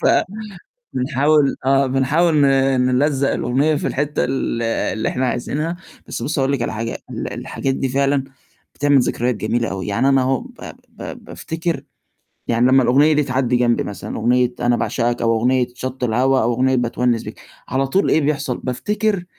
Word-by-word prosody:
ف -, -, +2 dB, 0.9 s
بنحاول 140 Hz, +2 st, +2 dB
آه، 135 Hz, 0 st, +4 dB
بنحاول 145 Hz, +6 st, +2 dB
ن 140 Hz, -, +5 dB, 0.4 s
نلزّق 135 Hz, +2 st, +1 dB
الأغنية 135 Hz, +6 st, +1 dB
في 145 Hz, -, -2 dB
الحِتّة 145 Hz, +2 st, -1 dB
ال 125 Hz, -2 st, -2 dB
اللي 115 Hz, -1 st, -1 dB
إحنا 130 Hz, +1 st, -1 dB
عايزينها، 150 Hz, +7 st, -2 dB, 0.3 s
بس -, -, -5 dB
بُصّي، 145 Hz, +2 st, -1 dB
هاقول 135 Hz, +1 st, +1 dB
لِك 135 Hz, -4 st, -1 dB
على 120 Hz, -, -2 dB
حاجة، 115 Hz, +1 st, -4 dB
ال -, -, -5 dB
الحاجات 135 Hz, -1 st, -3 dB
دي 135 Hz, 0 st, -1 dB
فعلًا 140 Hz, +1 st, +1 dB, 0.5 s
بتعمل 145 Hz, -1 st, +3 dB
ذكريات 120 Hz, 0 st, 0 dB
جميلة 115 Hz, +3 st, -1 dB
أوي، 95 Hz, -1 st, -4 dB
يعني 105 Hz, +6 st, +1 dB
أنا 135 Hz, -1 st, +4 dB
أهو 130 Hz, 0 st, +1 dB
ب -, -, -13 dB, 0.3 s
ب -, -, -13 dB, 0.2 s
بافتكر 165 Hz, +1 st, -4 dB, 0.7 s
يعني 120 Hz, +1 st, +3 dB
لمّا 130 Hz, 0 st, +5 dB
الأغنية 140 Hz, +6 st, +4 dB
دي 150 Hz, 0 st, +2 dB
تعدّي 130 Hz, -2 st, 0 dB
جنبي 120 Hz, -1 st, +2 dB
مثلًا، 100 Hz, -3 st, -6 dB
أغنية 125 Hz, +2 st, +2 dB
أنا 120 Hz, 0 st, +2 dB
باعشقك، 120 Hz, 0 st, -1 dB
أو 115 Hz, 0 st, +2 dB
أغنية 125 Hz, +2 st, +2 dB
شَطّ 130 Hz, +1 st, -5 dB
الهوا، 130 Hz, +3 st, +2 dB
أو 120 Hz, +2 st, +1 dB
أغنية 130 Hz, +2 st, +2 dB
باتونِّس 120 Hz, -1 st, 0 dB
بيك، -, -, -9 dB, 0.3 s
على 135 Hz, +1 st, 0 dB
طول 190 Hz, +9 st, +1 dB
إيه 160 Hz, -, +3 dB
بيحصل، 140 Hz, -3 st, -1 dB
بافتكر 205 Hz, -, -1 dB
130 Hz, 175 wpm, -20 LUFS, 120-140 Hz, 0.9 s, ن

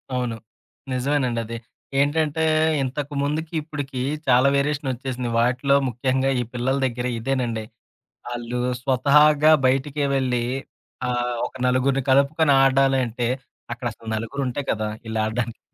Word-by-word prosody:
అవును. 125 Hz, -2 st, -1 dB, 0.6 s
నిజవేనండది. 125 Hz, -3 st, -1 dB, 0.4 s
ఏంటంటే 155 Hz, +2 st, +1 dB, 0.4 s
ఇంతకుముందుకిప్పుడికి 145 Hz, 0 st, -3 dB, 0.3 s
చాలా 125 Hz, +1 st, +5 dB
వేరియేషనోచ్చేసింది. 130 Hz, -3 st, -2 dB
వాటిలో 125 Hz, +4 st, +2 dB
ముఖ్యంగా, 130 Hz, +2 st, 0 dB
ఈ -, -, -1 dB
పిల్లల 125 Hz, +2 st, 0 dB
దెగ్గర 125 Hz, 0 st, -2 dB
ఇదేనండి. 120 Hz, -3 st, -2 dB, 0.7 s
ఆళ్ళు 120 Hz, 0 st, -4 dB, 0.2 s
స్వతహాగా 150 Hz, +3 st, +5 dB
బయటికే 135 Hz, +3 st, +1 dB
వెళ్ళి. 125 Hz, -3 st, 0 dB, 0.6 s
ఆహ్, 120 Hz, -1 st, -1 dB
ఒక -, -, -12 dB
నలుగురిని 130 Hz, +2 st, +2 dB
కలుపుకొని, 140 Hz, +3 st, +4 dB
ఆడాలంటే 130 Hz, -3 st, +2 dB, 0.4 s
అక్కడసలు 120 Hz, -2 st, -6 dB
నలుగురుంటే 125 Hz, +4 st, -3 dB
కదా! 110 Hz, 0 st, -1 dB, 0.2 s
ఇళ్ళడ్డానికి. 110 Hz, +1 st, -2 dB
130 Hz, 95 wpm, -23 LUFS, 120-140 Hz, 0.7 s, చాలా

